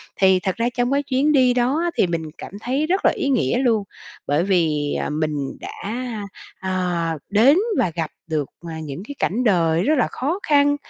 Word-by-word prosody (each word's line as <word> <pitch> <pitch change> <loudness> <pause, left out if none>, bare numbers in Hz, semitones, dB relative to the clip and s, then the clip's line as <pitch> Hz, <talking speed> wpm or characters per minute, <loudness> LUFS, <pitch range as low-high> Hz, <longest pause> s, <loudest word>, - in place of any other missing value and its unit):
Thì 190 -1 +4
thật 185 +1 -2
ra 235 +1 0
trong 245 +2 +1
cái 285 +1 +2
chuyến 280 +3 +1
đi 255 -3 +4
đó 250 +5 +1
á, 345 - 0
thì 185 - +4
mình 165 -1 -2
cảm - - -8
thấy 270 +5 0
rất 380 +3 0
là - - +6
ý 280 - -2
nghĩa 235 - +2
luôn, 230 -6 +2 0.4
bởi 145 +4 +2
vì, 160 -6 +1
ờ, - - -2
mình 150 -2 -2
đã, - - -7 0.9
ờ, 180 -3 -1
đến 240 - +5 0.2
và 175 - +2
gặp 160 -2 -2 0.2
được, 155 -4 -2 0.2
à, 160 0 -6
những 155 +4 -6
cái 285 - -7
cảnh 235 +7 0
đời 170 -5 +3
rất 310 - +3
là 245 - +3
khó 315 +9 -2
khăn. 290 -1 +4
195 Hz, 205 wpm, -22 LUFS, 165-265 Hz, 0.9 s, là